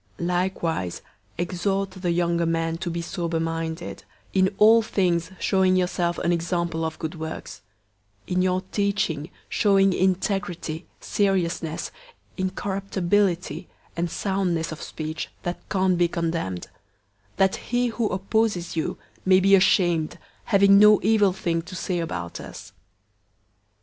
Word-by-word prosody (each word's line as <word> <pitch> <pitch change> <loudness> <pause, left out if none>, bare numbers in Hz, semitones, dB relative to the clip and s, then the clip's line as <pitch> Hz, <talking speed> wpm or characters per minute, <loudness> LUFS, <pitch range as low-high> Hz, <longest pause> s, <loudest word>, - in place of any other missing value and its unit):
002:006 170 - -3
Likewise, 175 - -1 0.4
exhort 190 +3 -1
the 185 -1 -3
younger 170 -1 +1
men 165 0 0
to 175 +1 -4
be 170 0 -3
sober 170 -2 -2
minded; 165 +1 -3 0.3
002:007 190 - +2
in 190 +1 +3
all 225 +2 +7
things 175 -6 0
showing 190 -1 +3
yourself 180 -1 0
an 170 - 0
example 170 -1 -1
of 160 -1 -3
good 160 -1 -4
works; 160 -1 -7 0.6
in 180 0 0
your 185 0 +1
teaching 200 -7 0 0.2
showing 195 -2 +3
integrity, 180 -3 -1
seriousness, 175 -5 -1 0.4
incorruptibility, 190 -1 -1 0.2
002:008 - - -35
and 170 0 0
soundness 180 -4 -1
of 160 - -7
speech 155 0 -5
that 175 0 -5
can't 185 -2 +2
be 175 - +4
condemned; 165 - -3 0.7
that 190 0 +2
he 245 0 0
who 225 -1 -1
opposes 195 -2 0
you 160 - -2 0.3
may 185 0 +5
be 195 +1 +4
ashamed, 175 -4 +3 0.3
having 200 -2 +6
no 210 0 +7
evil 210 -1 +4
thing 170 -3 -1
to 180 +3 -10
say 175 0 -2
about 85 - -4
us. - - -10
180 Hz, 135 wpm, -24 LUFS, 165-195 Hz, 0.7 s, all